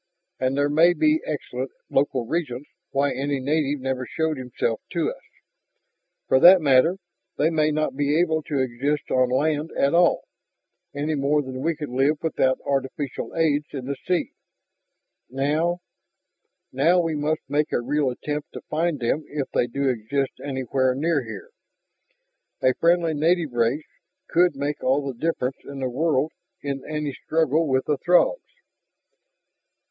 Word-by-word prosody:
And 130 Hz, +1 st, 0 dB
there 145 Hz, 0 st, +3 dB
may 160 Hz, +4 st, +5 dB
be 310 Hz, -, +2 dB
excellent -, -, -4 dB, 0.2 s
local 135 Hz, -3 st, 0 dB
reasons 145 Hz, -2 st, -3 dB, 0.2 s
why 140 Hz, +1 st, +1 dB
any 140 Hz, 0 st, -2 dB
native 145 Hz, +1 st, 0 dB
never 130 Hz, -1 st, -2 dB
showed 160 Hz, -1 st, -1 dB
himself 125 Hz, -3 st, -3 dB
to -, -, 0 dB
us. -, -, -12 dB, 1.1 s
For 130 Hz, -, +4 dB
that 180 Hz, +5 st, +9 dB
matter, 150 Hz, +4 st, +4 dB, 0.4 s
they 160 Hz, +3 st, +2 dB
may 155 Hz, -1 st, +2 dB
not 155 Hz, -2 st, -1 dB
be 145 Hz, +2 st, +1 dB
able 160 Hz, -2 st, +2 dB
to 145 Hz, -, -1 dB
exist 135 Hz, +4 st, -2 dB
on 130 Hz, -1 st, +3 dB
land 150 Hz, +4 st, 0 dB
at 140 Hz, -, +2 dB
all, 175 Hz, 0 st, +4 dB, 0.7 s
any 150 Hz, +2 st, -1 dB
more 145 Hz, +1 st, +1 dB
than 130 Hz, -1 st, -6 dB
we 165 Hz, +3 st, 0 dB
could 150 Hz, -1 st, -6 dB
live 135 Hz, +4 st, +2 dB
without 130 Hz, -5 st, +1 dB
artificial 135 Hz, 0 st, -3 dB
aids 150 Hz, -2 st, +1 dB
in 135 Hz, -3 st, -5 dB
the 140 Hz, +1 st, -3 dB
sea." 180 Hz, -1 st, 0 dB, 1.0 s
"Now 155 Hz, +7 st, 0 dB, 0.4 s
?" -, -, -54 dB, 0.2 s
"Now 165 Hz, +7 st, +3 dB
we 165 Hz, -2 st, 0 dB
must 150 Hz, +1 st, -1 dB
make 145 Hz, +2 st, 0 dB
a -, -, +1 dB
real 140 Hz, +3 st, 0 dB
attempt 145 Hz, +4 st, -5 dB
to -, -, -7 dB
find 165 Hz, 0 st, 0 dB
them 125 Hz, +6 st, 0 dB
if 145 Hz, -2 st, -4 dB
they 120 Hz, -, +1 dB
do 140 Hz, +3 st, -2 dB
exist 130 Hz, +3 st, -1 dB
anywhere 130 Hz, -1 st, 0 dB
near 150 Hz, 0 st, +1 dB
here. 110 Hz, -3 st, -9 dB, 1.1 s
A 130 Hz, -, +4 dB
friendly 170 Hz, +1 st, +2 dB
native 160 Hz, -1 st, +1 dB
race 120 Hz, +6 st, +1 dB, 0.4 s
could 175 Hz, -2 st, +3 dB
make 145 Hz, +2 st, -3 dB
all 140 Hz, +2 st, +2 dB
the 135 Hz, -, -3 dB
difference 135 Hz, -1 st, -2 dB
in 140 Hz, -, -9 dB
the 130 Hz, -2 st, -2 dB
world 150 Hz, +1 st, +1 dB, 0.3 s
in 140 Hz, -1 st, -3 dB
any 150 Hz, -2 st, -2 dB
struggle 160 Hz, +1 st, +1 dB
with 130 Hz, -1 st, +1 dB
the 145 Hz, -3 st, 0 dB
Throgs." 180 Hz, -, +3 dB
145 Hz, 155 wpm, -24 LUFS, 130-160 Hz, 1.1 s, that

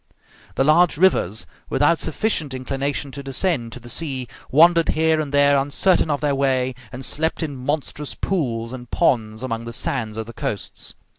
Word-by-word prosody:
The -, -, +2 dB
large 155 Hz, +3 st, +4 dB
rivers, 135 Hz, -, +2 dB, 0.2 s
without 145 Hz, +4 st, +3 dB
sufficient 160 Hz, -5 st, -1 dB
inclination 135 Hz, +2 st, -3 dB
to 140 Hz, -, -7 dB
descend 135 Hz, -2 st, 0 dB
to 125 Hz, -, -7 dB
the 120 Hz, -, -14 dB
sea, 130 Hz, -2 st, -3 dB, 0.2 s
wandered 165 Hz, +4 st, +5 dB
here 160 Hz, 0 st, +2 dB
and 145 Hz, -2 st, -5 dB
there 145 Hz, 0 st, +4 dB
uncertain 155 Hz, +5 st, +2 dB
of 145 Hz, -1 st, 0 dB
their 145 Hz, -2 st, +1 dB
way, 130 Hz, -2 st, +1 dB, 0.2 s
and 130 Hz, +1 st, -5 dB
slept 160 Hz, +2 st, 0 dB
in 145 Hz, -3 st, -4 dB
monstrous 145 Hz, +2 st, -3 dB
pools 120 Hz, -10 st, -2 dB
and 125 Hz, -2 st, -9 dB
ponds 115 Hz, -8 st, +1 dB
among 115 Hz, -2 st, -3 dB
the 115 Hz, -, -6 dB
sands 115 Hz, -4 st, -2 dB
of 110 Hz, -, -3 dB
the 115 Hz, -, -10 dB
coasts. 105 Hz, -2 st, -5 dB
140 Hz, 170 wpm, -22 LUFS, 125-155 Hz, 0.2 s, wandered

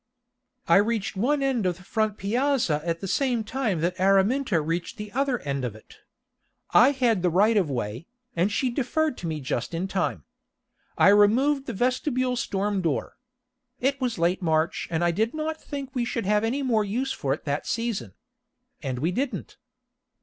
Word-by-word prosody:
I 170 Hz, -, +6 dB
reached 210 Hz, 0 st, 0 dB
one 275 Hz, +8 st, +1 dB
end 250 Hz, -8 st, +1 dB
of 175 Hz, -2 st, -1 dB
the 185 Hz, -, -15 dB
front 215 Hz, +1 st, -1 dB
piazza 230 Hz, -, +1 dB
at 170 Hz, 0 st, -2 dB
the 195 Hz, -, -4 dB
same 245 Hz, +1 st, +1 dB
time 215 Hz, -7 st, -1 dB
that 175 Hz, +2 st, -1 dB
Araminta 195 Hz, +3 st, +3 dB
reached 165 Hz, +8 st, -3 dB
the 210 Hz, -1 st, -7 dB
other 270 Hz, +1 st, 0 dB
end 140 Hz, -2 st, -3 dB
of 120 Hz, -4 st, -3 dB
it. 110 Hz, -, -16 dB, 0.7 s
I 250 Hz, -, +7 dB
had 245 Hz, -8 st, +1 dB
the 180 Hz, -, +2 dB
right 205 Hz, +6 st, +3 dB
of 190 Hz, -7 st, +2 dB
way, 120 Hz, +2 st, -4 dB, 0.3 s
and 180 Hz, +5 st, +1 dB
she 250 Hz, +4 st, 0 dB
deferred 290 Hz, +4 st, 0 dB
to 175 Hz, -, -4 dB
me 155 Hz, -2 st, -3 dB
just 130 Hz, +2 st, -3 dB
in 180 Hz, +3 st, -2 dB
time. 185 Hz, -, -2 dB, 0.7 s
I -, -, +6 dB
removed 255 Hz, +8 st, +4 dB
the -, -, -3 dB
vestibule 255 Hz, +1 st, 0 dB
storm 200 Hz, -3 st, -1 dB
door. 160 Hz, -6 st, -2 dB, 0.6 s
It 270 Hz, +1 st, 0 dB
was 250 Hz, -3 st, -1 dB
late 175 Hz, +2 st, +1 dB
in 180 Hz, -, -5 dB
March, 160 Hz, 0 st, +1 dB
and 165 Hz, 0 st, 0 dB
I 175 Hz, -, +3 dB
did 220 Hz, -, -1 dB
not 315 Hz, 0 st, -3 dB
think 275 Hz, -3 st, -6 dB
we 245 Hz, -, 0 dB
should 235 Hz, -2 st, -2 dB
have 210 Hz, +2 st, +2 dB
any 260 Hz, +5 st, 0 dB
more 225 Hz, -5 st, +2 dB
use 245 Hz, +7 st, -2 dB
for 135 Hz, -, -2 dB
it -, -, -19 dB
that 145 Hz, 0 st, -2 dB
season. 230 Hz, -3 st, -2 dB, 0.7 s
And 130 Hz, -4 st, -3 dB
we 160 Hz, +8 st, 0 dB
didn't. 265 Hz, +7 st, -3 dB
210 Hz, 185 wpm, -26 LUFS, 170-255 Hz, 0.7 s, I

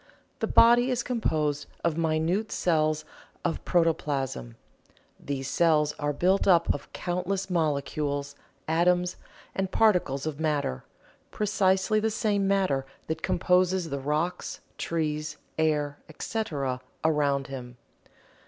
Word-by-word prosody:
The -, -, 0 dB
body 240 Hz, +2 st, +6 dB
is 250 Hz, -1 st, 0 dB
composed 150 Hz, -, -1 dB, 0.2 s
of 170 Hz, -2 st, +1 dB
minute 165 Hz, +6 st, 0 dB
cells 155 Hz, -3 st, +1 dB, 0.4 s
of -, -, -1 dB
protoplasm. 140 Hz, -, 0 dB, 0.6 s
These 135 Hz, -2 st, -4 dB
cells 150 Hz, 0 st, +3 dB
are 145 Hz, 0 st, 0 dB
built 185 Hz, +8 st, +2 dB
up 170 Hz, -3 st, +5 dB
of 145 Hz, -, -8 dB
countless 185 Hz, +2 st, -2 dB
molecules, 145 Hz, -3 st, -1 dB, 0.3 s
atoms 175 Hz, +2 st, +2 dB, 0.4 s
and 190 Hz, -1 st, -1 dB
particles 180 Hz, -11 st, +2 dB
of 155 Hz, -2 st, -4 dB
matter 145 Hz, -, -1 dB, 0.5 s
precisely 195 Hz, 0 st, +2 dB
the 220 Hz, +1 st, +1 dB
same 205 Hz, -2 st, 0 dB
matter 190 Hz, -9 st, +2 dB, 0.2 s
that 160 Hz, 0 st, -3 dB
composes 180 Hz, -1 st, +2 dB
the 140 Hz, -, -2 dB
rocks, 150 Hz, +6 st, -2 dB, 0.2 s
trees, 155 Hz, -2 st, -2 dB, 0.2 s
air, 150 Hz, -2 st, +1 dB
etc., 145 Hz, -, -3 dB, 0.2 s
around 145 Hz, -3 st, +2 dB
him. 125 Hz, -2 st, -8 dB
160 Hz, 115 wpm, -27 LUFS, 145-185 Hz, 0.6 s, body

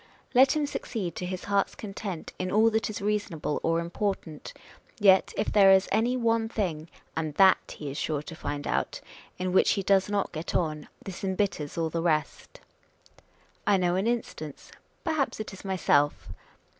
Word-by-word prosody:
Let 260 Hz, +1 st, +6 dB
him 300 Hz, -1 st, +1 dB
succeed 210 Hz, -10 st, -4 dB
to 180 Hz, -, -3 dB
his 185 Hz, 0 st, -5 dB
heart's 200 Hz, -1 st, 0 dB
content 195 Hz, -4 st, -6 dB
in 185 Hz, 0 st, -2 dB
all 220 Hz, +2 st, +4 dB
that 220 Hz, 0 st, 0 dB
is 215 Hz, -1 st, -5 dB
reasonable 205 Hz, -8 st, -1 dB
or 165 Hz, 0 st, +1 dB
important, 170 Hz, -2 st, -3 dB, 0.5 s
yet 190 Hz, -2 st, +5 dB
if -, -, 0 dB
there 200 Hz, -2 st, +6 dB
is 190 Hz, 0 st, +5 dB
any 235 Hz, +5 st, +2 dB
one 230 Hz, -2 st, +1 dB
thing 170 Hz, -8 st, -3 dB, 0.3 s
(and 155 Hz, -2 st, -3 dB
that 190 Hz, +2 st, +4 dB
he 145 Hz, -2 st, -5 dB
is 140 Hz, -, -5 dB
sure 150 Hz, -2 st, -2 dB
to 165 Hz, -, -9 dB
find 145 Hz, -1 st, -4 dB
out) -, -, -1 dB, 0.4 s
in 185 Hz, 0 st, -2 dB
which 190 Hz, -, +5 dB
he 195 Hz, -, -2 dB
does 195 Hz, +1 st, +3 dB
not 205 Hz, -1 st, 0 dB
get 160 Hz, 0 st, -5 dB
on, 155 Hz, -3 st, -1 dB, 0.2 s
this 195 Hz, -1 st, -7 dB
embitters 190 Hz, -6 st, -1 dB
all 165 Hz, -1 st, 0 dB
the 165 Hz, -, -1 dB
rest. 155 Hz, -3 st, -1 dB, 1.1 s
I 205 Hz, -1 st, +5 dB
know 175 Hz, -1 st, +1 dB
an 190 Hz, +4 st, 0 dB
instance. 190 Hz, -11 st, -4 dB, 0.3 s
Perhaps 315 Hz, -, -1 dB
it 215 Hz, -, -5 dB
is 190 Hz, -, -11 dB
myself. 165 Hz, -7 st, +1 dB
190 Hz, 175 wpm, -28 LUFS, 165-210 Hz, 1.1 s, Let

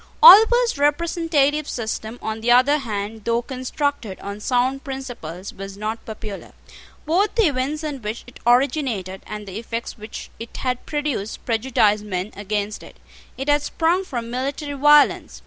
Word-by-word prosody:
Oliver's 470 Hz, -3 st, +8 dB
representative 300 Hz, -1 st, +1 dB
system, 220 Hz, 0 st, -4 dB
on 220 Hz, 0 st, -3 dB
the 235 Hz, -, -1 dB
other 255 Hz, +5 st, +5 dB
hand, 215 Hz, -3 st, -5 dB
though 235 Hz, +2 st, 0 dB
constructed 255 Hz, -4 st, -3 dB
on 200 Hz, +1 st, -6 dB
sound 255 Hz, +4 st, 0 dB
principles, 245 Hz, -, -7 dB
was 195 Hz, 0 st, -8 dB
not 215 Hz, +2 st, -4 dB
popular. 215 Hz, -2 st, -8 dB, 0.5 s
Both 365 Hz, +7 st, +1 dB
the 455 Hz, -3 st, +4 dB
events 290 Hz, +1 st, -1 dB
in 290 Hz, -4 st, -4 dB
which 215 Hz, +2 st, -5 dB
it 245 Hz, -, -14 dB
originated, 240 Hz, -, +1 dB
and 210 Hz, 0 st, -6 dB
the 195 Hz, +2 st, -5 dB
effects 230 Hz, 0 st, -5 dB
which 215 Hz, +1 st, -8 dB
it 230 Hz, 0 st, -8 dB
had 250 Hz, -1 st, -3 dB
produced, 290 Hz, -8 st, -3 dB
prejudiced 220 Hz, -3 st, +2 dB
men 190 Hz, 0 st, -3 dB
against 205 Hz, +1 st, -3 dB
it. -, -, -14 dB, 0.4 s
It 270 Hz, -, -5 dB
had 290 Hz, 0 st, +3 dB
sprung 335 Hz, +5 st, +1 dB
from 235 Hz, -9 st, -5 dB
military 280 Hz, +4 st, -3 dB
violence. 295 Hz, +1 st, +4 dB
245 Hz, 150 wpm, -22 LUFS, 215-290 Hz, 0.5 s, Oliver's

